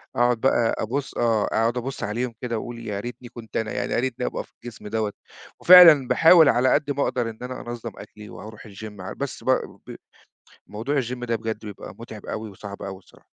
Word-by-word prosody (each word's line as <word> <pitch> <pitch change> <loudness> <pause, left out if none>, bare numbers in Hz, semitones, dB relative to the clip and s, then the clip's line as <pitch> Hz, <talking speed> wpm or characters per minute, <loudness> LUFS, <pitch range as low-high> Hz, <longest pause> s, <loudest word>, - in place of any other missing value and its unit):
أقعد 120 -1 +2
بقى 120 -3 +2
أبُص 135 +5 -3
آه، 115 -3 +2
أقعد 115 +2 0
أبُص 130 +2 -4
عليهم 115 +4 -2
كده 120 -2 -2
وأقول 115 0 -8
يا 100 -1 -3
ريتني 120 +2 -8
كنت 115 -3 -8
أنا، 110 -1 -2
يعني 100 -1 -2
يارتني 125 0 -1
أبقى - - -3
في - - -26
الجسم 120 -3 -9
دوّة، 110 -1 -2 0.5
وفعلًا 170 -7 +9
باحاول 165 +2 +6
على 125 +1 +3
قد 145 -1 +1
ما 140 0 0
أقدر 120 -2 -1
إن 110 - -10
أنا 125 0 -6
أنظم 120 -1 -6
أكلي 105 0 -12
وأروح 110 +1 -11
الgym 105 0 -10
ع 95 - -6
بس 140 -1 -6
ب - - -3 0.4
ب - - -8 0.7
موضوع 125 +7 -2
الgym 120 0 -5
ده 115 -1 0
بجد 110 -1 -4
بيبقى 105 -2 -9
مُتعِب 110 -2 -10
أوي 110 -1 -5
وصعب 100 +1 -10
أوي 95 -1 -6
الصراحة. 90 - -23
115 Hz, 200 wpm, -24 LUFS, 110-125 Hz, 0.7 s, وفعلًا